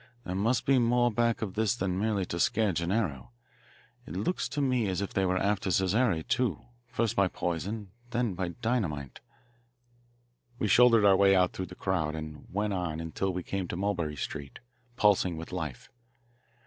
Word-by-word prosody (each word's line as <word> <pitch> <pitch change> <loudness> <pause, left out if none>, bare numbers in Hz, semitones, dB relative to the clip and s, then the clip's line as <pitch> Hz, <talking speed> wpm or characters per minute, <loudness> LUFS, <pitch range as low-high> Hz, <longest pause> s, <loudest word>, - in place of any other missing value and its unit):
There 90 - -4
must 115 +6 +1
be 135 -1 +4
more 120 0 +3
back 115 +1 +1
of 100 -4 -4
this 110 +2 +1
than 95 -5 -1
merely 105 -3 0
to 85 - -4
scare 105 +3 +2
Gennaro. 85 - -1 0.8
It 80 - -7
looks 105 - -1
to 145 - -3
me 125 -5 +1
as 90 -2 -1
if 100 - -4
they 95 -1 +1
were 90 0 +1
after 100 0 0
Casare, 95 -2 +1
too, 120 -10 0 0.2
first 115 -2 -1
by 100 -1 +4
poison, 95 +4 -3 0.2
then 120 -4 0
by 90 0 -2 0.2
dynamite." 85 - -1 1.4
We 110 - 0
shouldered 115 -1 +6
our 100 -1 +7
way 95 0 +5
out 90 -1 +3
through 95 - -4
the 90 - -11
crowd 85 -6 -1
and 75 -1 -7
went 105 +2 -1
on 90 -4 -2
until 80 +4 -2
we 90 0 -4
came 95 0 -3
to 85 - -4
Mulberry 90 -6 -1
Street, 70 +1 -6 0.4
pulsing 95 -6 +3
with 80 - -7
life. 80 -8 -5
95 Hz, 175 wpm, -29 LUFS, 90-110 Hz, 1.4 s, our